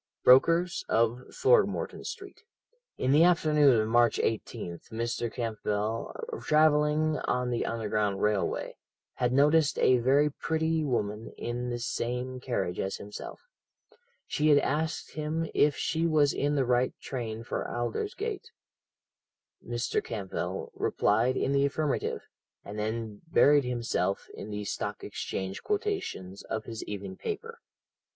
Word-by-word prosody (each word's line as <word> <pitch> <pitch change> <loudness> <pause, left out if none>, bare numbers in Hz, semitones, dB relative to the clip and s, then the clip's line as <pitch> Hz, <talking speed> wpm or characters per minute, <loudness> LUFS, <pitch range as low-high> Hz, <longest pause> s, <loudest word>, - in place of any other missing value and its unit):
brokers, 165 +7 +5
of 115 +2 +2
Throgmorton 440 +2 +2
Street. - - -8 0.6
"In 130 - +1
the 150 +4 +6
afternoon 150 -7 +5
of 110 - +1
March 120 +1 +4
18th 105 -6 -3
Mr. 115 0 -2
Campbell, 110 -1 -2 0.3
travelling 150 0 +3
on 125 0 0
the 120 - -1
Underground 105 -3 -1
Railway, 105 -1 0 0.4
had 125 -1 +1
noticed 145 +3 +4
a 130 -1 +4
very 140 +5 +3
pretty 160 +1 0
woman 110 -5 -2
in 120 +1 -3
the 120 - -2
same 125 +2 -3
carriage 100 -9 -2
as 95 - -2
himself. 105 +1 -8 0.8
She 150 - 0
had 145 - +7
asked 155 +3 -1
him 155 +2 -2
if 145 0 +3
she 165 +1 0
was 150 -3 +3
in 145 +1 0
the 135 -2 +2
right 125 +1 +1
train 115 -4 -5
for - - -3
Aldersgate. 120 -1 -3 1.1
Mr. 120 +1 -1
Campbell 100 -4 -4
replied 115 +5 +1
in 135 - 0
the 140 0 +3
affirmative, 150 +1 -1 0.4
and 105 +1 -6
then 110 -1 -3
buried 145 -3 +5
himself 115 -6 -1
in 105 - -8
the 105 0 -4
Stock - - -4
Exchange 95 0 -4
quotations 395 - -3
of 110 -1 -4
his 115 -1 -6
evening 100 -2 -6
paper. - - -5
125 Hz, 130 wpm, -29 LUFS, 110-150 Hz, 1.1 s, had